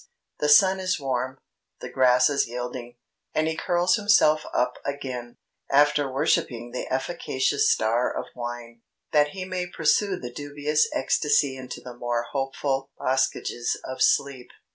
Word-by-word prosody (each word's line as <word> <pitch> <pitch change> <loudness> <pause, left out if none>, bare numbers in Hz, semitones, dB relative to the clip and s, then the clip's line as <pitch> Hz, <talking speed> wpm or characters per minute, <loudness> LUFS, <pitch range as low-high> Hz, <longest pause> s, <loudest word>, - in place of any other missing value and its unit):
The 150 - +1
sun 190 +5 +6
is 185 -2 -1
warm, 130 -1 -2 0.4
the - - -7
grasses 130 +2 +3
yielding; 120 0 -6 0.4
and 155 0 +2
he 160 - -1
curls 175 +2 +1
himself 205 -7 +3
up 125 0 0
again, 130 -4 -5 0.3
after 145 0 +3
worshipping 120 -2 0
the 125 - -5
efficacious 135 -1 0
star 115 +3 +1
of - - -4
wine, 120 -1 -7 0.3
that 150 -1 +4
he 190 -1 -5
may 185 -1 -3
pursue 180 +3 +1
the 120 -5 -8
dubious 145 +2 0
ecstasy 145 0 +1
into 130 -1 -8
the 125 - -9
more 120 -1 -2
hopeful 135 0 -2
boskages 130 -2 -1
of 130 0 -6
sleep." 140 -3 +2
135 Hz, 140 wpm, -25 LUFS, 125-150 Hz, 0.4 s, sun